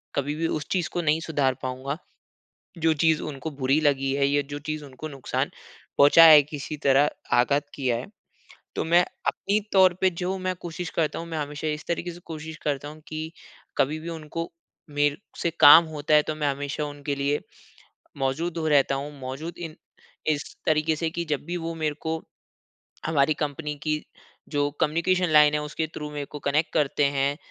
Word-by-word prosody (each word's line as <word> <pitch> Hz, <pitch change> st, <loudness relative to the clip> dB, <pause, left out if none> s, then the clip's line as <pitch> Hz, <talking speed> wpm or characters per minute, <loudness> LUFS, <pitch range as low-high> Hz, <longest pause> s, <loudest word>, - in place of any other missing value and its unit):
कभी 145 Hz, +2 st, -1 dB
भी 165 Hz, +1 st, -1 dB
उस 155 Hz, -, -3 dB
चीज़ 180 Hz, -3 st, 0 dB
को 175 Hz, -, 0 dB
नहीं 155 Hz, 0 st, +2 dB
सुधार 145 Hz, -5 st, +1 dB
पाऊँगा 130 Hz, +3 st, -3 dB, 0.8 s
जो 160 Hz, 0 st, +3 dB
चीज़ 160 Hz, +1 st, +2 dB
उनको 150 Hz, +1 st, -5 dB
बुरी 140 Hz, +1 st, +1 dB
लगी 135 Hz, -2 st, +2 dB
है 140 Hz, 0 st, +2 dB
या 145 Hz, 0 st, +2 dB
जो 145 Hz, -, -4 dB
चीज़ 155 Hz, 0 st, -5 dB
उनको 140 Hz, +3 st, -8 dB
नुकसान 135 Hz, -3 st, -2 dB, 0.5 s
पहुँचा 145 Hz, +4 st, +8 dB
है, 155 Hz, -2 st, +10 dB
किसी 150 Hz, +1 st, -6 dB
तरह 140 Hz, 0 st, +3 dB, 0.3 s
आघात 140 Hz, +4 st, +2 dB
किया 125 Hz, -4 st, 0 dB
है। 120 Hz, -, -5 dB, 0.7 s
तो -, -, 0 dB
मैं 170 Hz, +2 st, +5 dB, 0.3 s
अपनी 205 Hz, +2 st, +1 dB
तौर 185 Hz, -2 st, +6 dB
पे 190 Hz, -, +5 dB
जो 180 Hz, +2 st, -3 dB
मैं 185 Hz, 0 st, -2 dB
कोशिश 175 Hz, 0 st, -5 dB
करता 160 Hz, -1 st, 0 dB
हूँ 170 Hz, -, -6 dB
मैं 165 Hz, -1 st, -4 dB
हमेशा 150 Hz, +1 st, -4 dB
इस 150 Hz, 0 st, -3 dB
तरीके 170 Hz, +1 st, -2 dB
से 175 Hz, -, -11 dB
कोशिश 160 Hz, 0 st, -7 dB
करता 145 Hz, -1 st, -1 dB
हूँ 155 Hz, +1 st, -10 dB
कि 155 Hz, +1 st, -5 dB, 0.5 s
कभी 150 Hz, +4 st, +1 dB
भी 165 Hz, +2 st, -7 dB
उनको 165 Hz, +1 st, -5 dB, 0.4 s
मेरे 145 Hz, 0 st, +1 dB, 0.2 s
से 170 Hz, -, +2 dB
काम 160 Hz, +3 st, +10 dB
होता 155 Hz, -1 st, -2 dB
है 150 Hz, -, +7 dB
तो 155 Hz, -, -3 dB
मैं 150 Hz, -1 st, -1 dB
हमेशा 145 Hz, +2 st, -3 dB
उनके 145 Hz, -1 st, -4 dB
लिए 140 Hz, +1 st, 0 dB, 0.8 s
मौजूद 155 Hz, +6 st, -1 dB
हो 160 Hz, -1 st, -1 dB
रहता 140 Hz, -2 st, +4 dB
हूँ। 145 Hz, +2 st, -4 dB
मौजूद 135 Hz, +6 st, -6 dB
इन 165 Hz, -3 st, -7 dB, 0.5 s
इस 150 Hz, -2 st, +1 dB, 0.2 s
तरीके 155 Hz, 0 st, +2 dB
से 160 Hz, +1 st, -1 dB
कि 170 Hz, +1 st, -4 dB
जब 145 Hz, -2 st, -1 dB
भी 175 Hz, +1 st, -3 dB
वो 165 Hz, 0 st, -4 dB
मेरे 155 Hz, -2 st, -1 dB
को, 160 Hz, 0 st, -1 dB, 0.9 s
हमारी 150 Hz, -1 st, +3 dB
कंपनी 150 Hz, 0 st, -3 dB
की 155 Hz, -1 st, -1 dB, 0.5 s
जो 145 Hz, -1 st, 0 dB
कम्युनिकेशन 170 Hz, +3 st, +2 dB
लाइन 150 Hz, -1 st, +6 dB
है -, -, +2 dB
उसके 155 Hz, +2 st, -3 dB
थ्रू 150 Hz, 0 st, -5 dB
मेरे 145 Hz, -1 st, -4 dB
को 150 Hz, -, -8 dB
कनेक्ट 150 Hz, +3 st, +1 dB
करते 145 Hz, 0 st, +2 dB
हैं 140 Hz, 0 st, +1 dB
150 Hz, 190 wpm, -25 LUFS, 145-160 Hz, 0.9 s, है